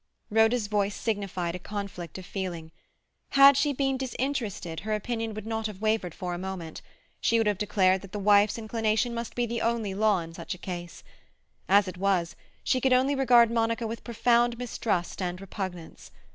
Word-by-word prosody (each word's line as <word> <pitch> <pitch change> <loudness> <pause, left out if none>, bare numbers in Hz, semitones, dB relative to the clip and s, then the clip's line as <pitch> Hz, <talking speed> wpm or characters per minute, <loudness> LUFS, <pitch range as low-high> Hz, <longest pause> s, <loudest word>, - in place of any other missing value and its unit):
Rhoda's 225 +1 +3
voice 205 -1 0
signified 195 -6 -2
a 180 - -5
conflict 195 -4 -6
of 185 - -9
feeling. 175 -5 -5 0.7
Had 275 0 +9
she 285 +2 +2
been 270 -1 0
disinterested 245 - -3
her 215 +3 -2
opinion 225 0 -3
would 215 - -6
not 220 0 -2
have 205 -3 -9
wavered 215 -5 0
for 180 -1 -4
a 175 - -4
moment; 185 -4 -6 0.4
she 230 - +2
would 225 - +2
have 205 -2 0
declared 190 -3 +2
that 195 - -12
the 210 - -4
wife's 205 +1 +4
inclination 225 +1 0
must 235 0 -5
be 245 - +1
the 235 0 -3
only 230 -4 0
law 210 0 +3
in 165 0 -9
such 170 +1 -6
a - - -13
case. 175 -2 -7 0.7
As 200 0 +5
it 185 - -6
was, 185 -3 +1 0.3
she 255 - +1
could 265 0 +3
only 260 +3 +3
regard 245 -4 +5
Monica 230 0 0
with 225 +1 -5
profound 235 0 +2
mistrust 220 -7 -2
and 180 0 -3
repugnance. 185 -4 -7
210 Hz, 185 wpm, -27 LUFS, 185-235 Hz, 0.7 s, Had